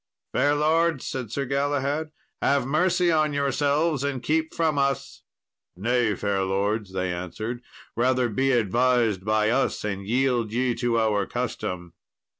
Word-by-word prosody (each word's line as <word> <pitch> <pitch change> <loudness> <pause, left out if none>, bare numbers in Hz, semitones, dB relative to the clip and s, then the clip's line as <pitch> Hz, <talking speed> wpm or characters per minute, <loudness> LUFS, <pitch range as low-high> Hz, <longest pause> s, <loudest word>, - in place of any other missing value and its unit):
"Fair 145 +1 +3
lords," 160 0 +2
said 125 -5 -4
Sir 140 +2 -2
Galahad, 145 +3 -1 0.3
"have 140 -2 +2
mercy 175 +5 +2
on 155 -2 +2
yourselves 145 +2 +1
and 135 -3 -2
keep 160 +4 0
from 155 -3 0
us." 140 -1 -1 0.5
"Nay, 115 +2 +1
fair 100 -1 -1
lords," 100 +2 -1
they 95 -1 -2
answered, 110 +7 -5 0.3
"rather 125 +1 +2
be 135 +5 0
advised 120 -3 +2
by 110 +1 +2
us, 135 +3 0
and 100 -1 -4
yield 120 -2 +1
ye 125 +1 +1
to 120 -1 0
our 105 -3 +1
custom." 85 -2 -4
125 Hz, 140 wpm, -25 LUFS, 105-145 Hz, 0.5 s, Fair